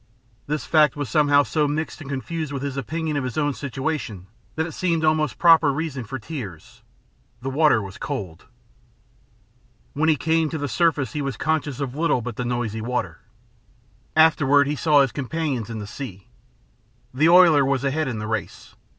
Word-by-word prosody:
This 150 Hz, +1 st, -2 dB
fact 155 Hz, -1 st, +4 dB
was 145 Hz, -3 st, -4 dB
somehow 145 Hz, -2 st, +4 dB
so 150 Hz, +3 st, 0 dB
mixed 155 Hz, +2 st, -3 dB
and 140 Hz, -, -9 dB
confused 155 Hz, +3 st, -4 dB
with 140 Hz, -1 st, -4 dB
his 140 Hz, -2 st, -3 dB
opinion 155 Hz, +3 st, -3 dB
of 140 Hz, -, -1 dB
his 125 Hz, -3 st, -5 dB
own 145 Hz, -2 st, +1 dB
situation 135 Hz, -, -4 dB, 0.3 s
that 160 Hz, -, 0 dB
it 165 Hz, -, -6 dB
seemed 165 Hz, -2 st, 0 dB
almost 155 Hz, -3 st, +1 dB
a -, -, -32 dB
proper 165 Hz, -4 st, +6 dB
reason 140 Hz, -4 st, -4 dB
for 135 Hz, +5 st, -5 dB
tears. 110 Hz, -, -8 dB, 0.6 s
The 135 Hz, -, -2 dB
water 145 Hz, -6 st, +3 dB
was 95 Hz, 0 st, -9 dB
cold. 120 Hz, -, -5 dB, 1.5 s
When 160 Hz, +3 st, +1 dB
he 155 Hz, -, +4 dB
came 160 Hz, +2 st, +1 dB
to 160 Hz, -, -4 dB
the 145 Hz, -1 st, -3 dB
surface 140 Hz, -1 st, +1 dB
he 150 Hz, -, -2 dB
was 135 Hz, -5 st, -3 dB
conscious 155 Hz, -4 st, -1 dB
of 135 Hz, -3 st, -3 dB
little 150 Hz, -5 st, 0 dB
but 120 Hz, -2 st, -5 dB
the 125 Hz, -, -3 dB
noisy 120 Hz, -3 st, -2 dB
water. 125 Hz, +2 st, -3 dB, 1.0 s
Afterward 145 Hz, -3 st, +5 dB
he 145 Hz, +2 st, -1 dB
saw 150 Hz, -1 st, +4 dB
his 135 Hz, -3 st, +1 dB
companions 140 Hz, -4 st, -3 dB
in 115 Hz, -, -5 dB
the 105 Hz, -, -5 dB
sea. 100 Hz, -, -9 dB, 0.8 s
The 155 Hz, +5 st, +3 dB
oiler 170 Hz, -5 st, +7 dB
was 135 Hz, -1 st, 0 dB
ahead 145 Hz, +2 st, 0 dB
in 120 Hz, -4 st, -3 dB
the 105 Hz, -, -4 dB
race. 110 Hz, -4 st, -5 dB
145 Hz, 185 wpm, -23 LUFS, 125-155 Hz, 1.5 s, oiler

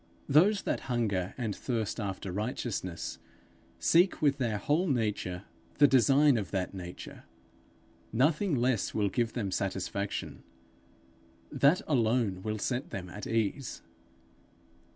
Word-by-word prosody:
Those 185 Hz, +9 st, +4 dB
that -, -, -1 dB
hunger 105 Hz, -6 st, -1 dB
and 110 Hz, -6 st, -2 dB
thirst 115 Hz, -3 st, -2 dB
after 95 Hz, -2 st, -4 dB
righteousness, 100 Hz, -3 st, -3 dB, 0.6 s
seek 175 Hz, +3 st, +3 dB
with 145 Hz, -2 st, +2 dB
their 115 Hz, -5 st, 0 dB
whole 155 Hz, -, +1 dB
nature 105 Hz, -, -1 dB, 0.3 s
the 145 Hz, -, +7 dB
design 135 Hz, +2 st, +5 dB
of 100 Hz, -5 st, -3 dB
that 95 Hz, -2 st, -2 dB
nature. 90 Hz, -2 st, -9 dB, 0.9 s
Nothing 150 Hz, -, +2 dB
less 125 Hz, -3 st, 0 dB
will 105 Hz, -2 st, +2 dB
give 115 Hz, +3 st, -1 dB
them 100 Hz, -6 st, -2 dB
satisfaction; 95 Hz, +1 st, -3 dB, 1.1 s
that 145 Hz, +6 st, +3 dB
alone 115 Hz, -8 st, +1 dB
will 110 Hz, +2 st, -3 dB
set 125 Hz, +5 st, -2 dB
them 90 Hz, -2 st, -6 dB
at 105 Hz, -, -7 dB
ease. 115 Hz, +4 st, -2 dB
115 Hz, 120 wpm, -30 LUFS, 100-135 Hz, 1.1 s, the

